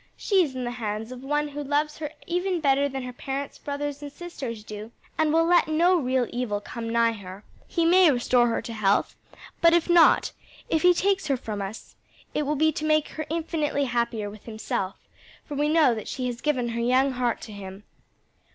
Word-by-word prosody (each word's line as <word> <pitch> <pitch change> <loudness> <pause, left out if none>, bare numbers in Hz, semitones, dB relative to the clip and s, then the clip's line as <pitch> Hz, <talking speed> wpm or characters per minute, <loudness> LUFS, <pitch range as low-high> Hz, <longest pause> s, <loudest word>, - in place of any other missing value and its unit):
"She 390 -3 +3
is 275 -5 -4
in 255 - -3
the 240 - -2
hands 220 -1 -4
of 255 -1 -8
One 295 +2 0
who 290 0 -5
loves 295 +2 -1
her 300 -2 -3 0.2
even 360 +1 -1
better 280 -1 +2
than 270 -1 -4
her 250 0 -6
parents, 270 +2 -5
brothers 285 0 -4
and 290 -1 -7
sisters 270 -10 -7
do, 215 +1 -8 0.2
and 315 -1 +2
will 330 +1 +4
let 350 0 +4
no 335 +4 +3
real 255 -2 +1
evil 240 -4 -2
come 230 +2 -6
nigh 230 0 +3
her. 200 -2 -9 0.2
He 335 -2 0
may 360 +1 +6
restore 245 -2 +3
her 230 - -1
to 230 - -6
health, 205 -2 +1 0.5
but 335 0 +6
if 345 - +2
not 345 -2 +5 0.4
if 320 - +2
he 360 0 +6
takes 390 -1 +1
her 275 -2 +1
from 215 -4 -5
us, 200 +3 -7 0.4
it 300 - -1
will 300 - +1
be 315 +2 +3
to 305 - -5
make 310 -1 +2
her 310 -1 -6
infinitely 310 -3 -1
happier 235 -4 -1
with 205 0 -11
himself; 215 -4 -3 0.5
for 295 - -7
we 295 +1 +1
know 305 -5 +5
that 215 -2 -6
she 255 - -3
has 245 -1 -4
given 255 -6 0
her 235 0 -2
young 255 +3 +3
heart 245 -2 -1
to 220 - -9
him." 195 0 -9
270 Hz, 210 wpm, -26 LUFS, 230-310 Hz, 0.5 s, may